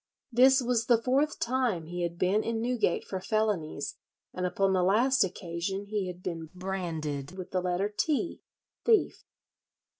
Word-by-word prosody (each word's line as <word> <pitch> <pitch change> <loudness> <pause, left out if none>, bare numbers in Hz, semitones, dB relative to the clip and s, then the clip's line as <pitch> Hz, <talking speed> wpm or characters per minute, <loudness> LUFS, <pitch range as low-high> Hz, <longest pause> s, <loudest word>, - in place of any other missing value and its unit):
This 260 +2 +6
was 240 -2 +1
the 235 -2 +5
fourth 275 +5 +1
time 235 -9 0
he 175 +2 -5
had 170 0 -2
been 190 +5 +2
in 230 -1 -1
Newgate 235 -6 0
for 190 -1 -4
felonies, 190 -10 -1 0.4
and 180 0 -1
upon 195 +1 +1
the 185 - +3
last 230 +8 +4
occasion 185 +1 -3
he 205 -2 -2
had 180 0 -8
been 165 -3 -4
branded 170 -5 -4
with 185 - -7
the 185 - 0
letter 180 +2 0
T 295 - -1 0.4
(thief). 450 -3 +2
195 Hz, 155 wpm, -29 LUFS, 175-235 Hz, 0.4 s, This